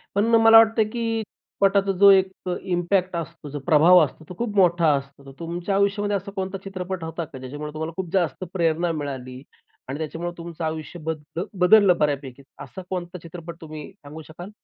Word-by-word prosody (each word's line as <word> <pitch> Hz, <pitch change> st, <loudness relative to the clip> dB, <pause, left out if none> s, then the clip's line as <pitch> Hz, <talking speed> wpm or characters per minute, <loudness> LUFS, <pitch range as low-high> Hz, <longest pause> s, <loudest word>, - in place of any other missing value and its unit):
पण 205 Hz, -, +3 dB
मला 225 Hz, 0 st, +8 dB
वाटतं 225 Hz, 0 st, +5 dB
आहे 215 Hz, -, 0 dB
की 230 Hz, -1 st, -2 dB
चित्रपटाचा 195 Hz, -1 st, 0 dB
जो 200 Hz, -, +8 dB
एक 190 Hz, -1 st, +4 dB, 0.2 s
अ, 180 Hz, -, -1 dB
इम्पॅक्ट 180 Hz, 0 st, 0 dB
असतो, 165 Hz, -2 st, -6 dB
जो 145 Hz, +1 st, -5 dB
प्रभाव 175 Hz, +2 st, +6 dB
असतो, 155 Hz, +4 st, -12 dB
तो -, -, -6 dB
खूप 230 Hz, -3 st, -3 dB
मोठा 175 Hz, -4 st, +4 dB
असतो. 140 Hz, 0 st, -7 dB
तर 135 Hz, -, -11 dB
तुमच्या 175 Hz, +3 st, -3 dB
आयुष्यामध्ये 200 Hz, +1 st, +1 dB
असा 200 Hz, +1 st, -8 dB
कोणता 190 Hz, 0 st, -3 dB
चित्रपट 185 Hz, -2 st, -5 dB
होता 165 Hz, +1 st, -4 dB
का, 140 Hz, -, -11 dB
ज्याच्यामुळे 145 Hz, +4 st, -7 dB
तुम्हाला 160 Hz, +1 st, -5 dB
खूप 180 Hz, -3 st, -4 dB
जास्त 185 Hz, -1 st, 0 dB
प्रेरणा 170 Hz, -1 st, +1 dB
मिळाली 130 Hz, -4 st, -6 dB, 0.5 s
आणि 135 Hz, +2 st, -4 dB
त्याच्यामुळं 165 Hz, +2 st, -4 dB
तुमचं 170 Hz, -1 st, -7 dB
आयुष्य 160 Hz, +2 st, -5 dB
बद्द 160 Hz, +1 st, -5 dB, 0.2 s
बदललं 190 Hz, -1 st, +6 dB
बऱ्यापैकी? 140 Hz, -3 st, -2 dB, 0.2 s
असा 190 Hz, -, -9 dB
कोणता 180 Hz, -1 st, -4 dB
चित्रपट 170 Hz, 0 st, -9 dB
तुम्ही 155 Hz, +1 st, -9 dB
सांगू 155 Hz, -4 st, -11 dB
शकाल? 175 Hz, +4 st, -10 dB
175 Hz, 185 wpm, -23 LUFS, 155-195 Hz, 0.5 s, मला